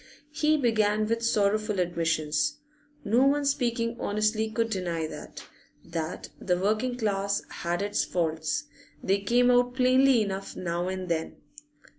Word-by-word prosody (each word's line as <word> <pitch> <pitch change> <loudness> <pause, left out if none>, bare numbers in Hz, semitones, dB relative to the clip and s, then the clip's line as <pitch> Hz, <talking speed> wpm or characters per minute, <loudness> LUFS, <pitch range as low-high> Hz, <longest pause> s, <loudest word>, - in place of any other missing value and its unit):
He 305 0 +2
began 215 -5 +2
with 230 +1 -1
sorrowful 215 -2 +1
admissions. 165 - 0 0.5
No 235 +4 +3
one 285 +1 +2
speaking 235 -4 0
honestly 215 +1 0
could 230 0 -1
deny 175 -5 -2
that 155 - -9 0.4
that 165 0 -5
the 180 -2 0
working 215 +6 0
class 200 -3 0
had 175 +3 -2
its 205 0 0
faults; 165 - -1 0.4
they 195 +1 +2
came 245 +4 +3
out 245 0 +3
plainly 255 -2 +4
enough 195 -1 -5
now 175 0 -2
and 185 0 -4
then. 160 -2 -2
215 Hz, 135 wpm, -27 LUFS, 180-245 Hz, 0.5 s, plainly